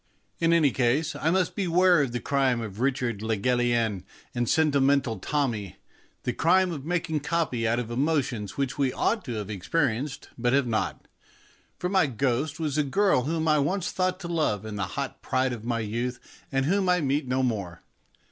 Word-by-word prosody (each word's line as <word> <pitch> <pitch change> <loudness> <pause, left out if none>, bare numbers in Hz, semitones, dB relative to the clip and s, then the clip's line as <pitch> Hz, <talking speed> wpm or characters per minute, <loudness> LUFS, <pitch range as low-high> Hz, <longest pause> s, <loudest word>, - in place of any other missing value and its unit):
In 165 0 +3
any 160 -5 +4
case, 130 +6 +1
I 160 - 0
must 185 0 +1
beware 180 -3 +4
of 135 -4 -1
the 120 - -2
crime 135 -3 +1
of 110 -3 -6
Richard 125 -5 0
le 110 0 -1
Gallienne 120 -3 +1 0.3
and 120 -1 -1
Sentimental 140 -7 +2
Tommy, 115 - -2 0.5
the 125 - -1
crime 180 +6 +3
of 145 -5 -5
making 160 -1 -1
copy 140 -7 -1
out 115 +1 +1
of 120 -1 -3
emotions 130 -6 -1
which 140 0 -2
we 135 -2 +2
ought 220 - 0
to 125 - -4
have 105 -1 -4
experienced 135 - -1
but 120 +1 +1
have 140 -1 +3
not, 110 -3 -2 0.7
for 180 - -2
my 185 -4 +3
ghost 135 +5 -1
was 155 -2 -1
a - - +3
girl 145 -2 +2
whom 160 +1 -1
I 155 -1 +4
once 175 +6 0
thought 185 0 0
to 170 - -5
love 155 - 0
in 110 -1 -6
the 100 -1 -2
hot - - -4
pride 130 0 0
of 115 -3 -7
my 115 -1 -1
youth, 120 +4 -3 0.3
and 135 -1 +1
whom 190 +3 +1
I 180 0 +4
meet 140 -2 0
no 130 +1 +1
more. 100 -8 -3
135 Hz, 190 wpm, -26 LUFS, 120-160 Hz, 0.7 s, any